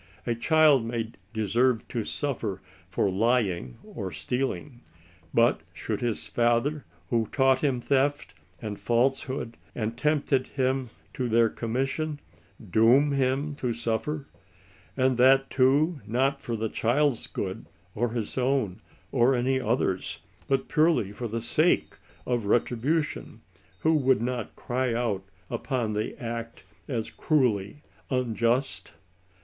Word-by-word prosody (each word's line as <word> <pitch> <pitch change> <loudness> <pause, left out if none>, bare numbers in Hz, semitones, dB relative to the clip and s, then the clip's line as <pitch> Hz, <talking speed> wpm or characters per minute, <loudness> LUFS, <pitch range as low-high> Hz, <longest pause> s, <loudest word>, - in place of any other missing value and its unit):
A 120 - +1
child 150 +1 +4
may 115 -1 -3
<* 100 - -36
deserve 115 +2 +1
to 115 - -2
suffer" 115 -8 -3 0.3
for 100 - +1
lying 95 - +1
or - - -6
stealing; 130 0 -3 0.5
but 115 -4 +3
should 100 +5 -4
his 120 -3 -1
father, 120 +5 +1 0.3
who 115 -2 +2
had - - -18
taught 135 -1 +4
him 135 -4 +1
theft 140 +3 0 0.3
and 105 -3 -5
falsehood, 125 0 0 0.2
and 115 0 -2
tempted 140 -1 +1
him 130 -1 -1 0.2
to 125 -2 -2
their 115 0 +4
commission, 135 +7 -2 0.4
^* 100 - -14
doom 125 +8 +5
him 140 +2 0
to 125 -4 -1
suffer," 120 +6 -2 0.7
and 130 -1 +2
that 135 +2 +5
too, 140 +4 +3
not 135 +4 +1
for 120 - -3
the 110 0 -1
child's 125 +4 +1
good, 95 +3 -5 0.3
or 120 +2 0
his 115 +2 -3
own, 125 -6 0 0.3
or 130 +1 +4
any 130 +2 +1
other's, 110 -6 0 0.3
but 135 -1 +1
purely 155 - +2
for 120 +3 -5
the 115 +1 -3
sake 155 +9 +2 0.3
of 120 -3 -1
"retribution," 130 +8 0 0.4
who 160 - +3
would 135 -6 +3
not 120 -1 -3
cry 125 -1 -1
out 115 -5 -1 0.3
upon 120 -6 -1
the 105 +1 -3
act 115 -1 -5 0.2
as 115 -5 -3
cruelly 125 -4 0 0.3
unjust? 115 -5 0
125 Hz, 130 wpm, -27 LUFS, 115-135 Hz, 0.7 s, doom